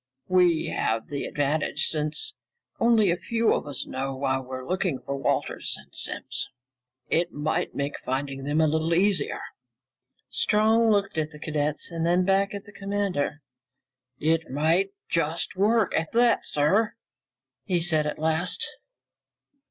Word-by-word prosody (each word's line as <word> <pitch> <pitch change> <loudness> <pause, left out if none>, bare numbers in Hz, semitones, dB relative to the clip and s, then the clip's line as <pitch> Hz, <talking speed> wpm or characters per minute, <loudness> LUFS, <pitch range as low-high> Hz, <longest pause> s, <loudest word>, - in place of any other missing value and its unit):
We 180 -3 +4
have 110 0 -1
the 140 -1 -3
advantage, 145 +1 0
since 155 - -2 0.5
only 225 -5 +4
a - - +2
few 230 +4 +1
of - - -2
us 140 -3 -3
know 135 +1 -3
why 130 0 0
we're 130 0 -7
looking 185 -5 0
for 135 +2 -4
Wallace 135 -2 -1
and - - -16
Simms. - - -2 0.6
It 170 +1 +2
might 155 +4 -1
make 140 +1 -2
finding 135 +1 -2
them 145 +3 +1
a 155 - +4
little 160 +2 +1
easier." 190 -3 +2 0.9
Strong 220 +2 +3
looked 200 -5 +1
at 155 -1 -1
the 150 - -12
cadets 150 +1 -1
and 165 -1 -2
then 175 +2 +3
back 195 +1 +2
at 200 - -7
the 205 - -13
commander. 195 -8 -2 0.8
"It 160 +1 +1
might 160 +8 +2 0.2
just 165 +1 -1
work, 210 +1 +2
at 160 0 -1
that, 235 0 +3
sir," 190 +10 +2 0.7
he 180 -4 +1
said 160 -3 +3
at 150 - -3
last. 160 - 0
165 Hz, 145 wpm, -26 LUFS, 145-195 Hz, 0.9 s, We